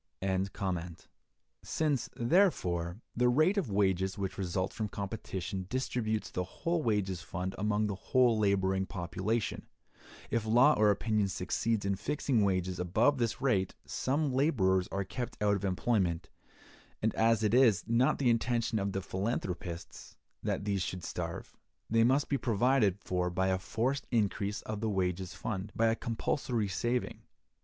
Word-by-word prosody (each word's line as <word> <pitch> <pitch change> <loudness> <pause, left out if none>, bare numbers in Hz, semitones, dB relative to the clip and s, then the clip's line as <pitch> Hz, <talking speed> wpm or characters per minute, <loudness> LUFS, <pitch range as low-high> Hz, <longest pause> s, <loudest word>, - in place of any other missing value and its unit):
Since, 145 -6 0
therefore, 110 - +1
the 125 +1 +3
rate 155 - +3
of 160 - -3
wages 95 -1 +1
which 95 -2 -3
results 95 0 -2
from 110 - -2
competition 95 -3 -5
distributes 115 -4 -2
the 90 - -1
whole 165 - -2
wages 100 - 0
fund 95 +1 -4
among 105 +1 +1
the 105 - -1
whole 120 +5 +3
laboring 95 -2 +1
population, 100 +4 -2 0.6
if 115 -2 +1
law 120 +7 +5
or 105 -4 +4
opinion 105 0 +1
succeeds 100 +3 -1
in 100 - +1
fixing 125 0 0
wages 95 -2 0
above 110 +11 +2
this 115 -2 -1
rate, 100 -9 +1
some 140 +1 -1
laborers 95 - +2
are 100 - -2
kept 120 +6 -5
out 105 -1 +3
of 100 - -4
employment; 95 -3 0 0.7
and 110 - +2
as 110 0 +3
it 105 0 +2
is 120 -6 +5
not 125 +6 +2
the 125 -4 +3
intention 115 -1 0
of 100 0 -2
the 95 - -2
philanthropists 95 -4 -4 0.2
that - - -2
these 100 -2 0
should 90 -1 -4
starve, - - -5 0.4
they 115 0 +5
must 135 +4 +3
be 140 - 0
provided 115 -3 +2
for 90 -2 -1
by 95 +2 0
a 95 0 +1
forced 125 +8 -1
increase 105 -3 0
of 110 -1 -5
the 110 - 0
wages 95 -2 -1
fund—by 105 +2 -2
a 115 0 +3
compulsory 115 -1 -1
saving. 120 +6 -2
105 Hz, 150 wpm, -31 LUFS, 95-120 Hz, 0.7 s, law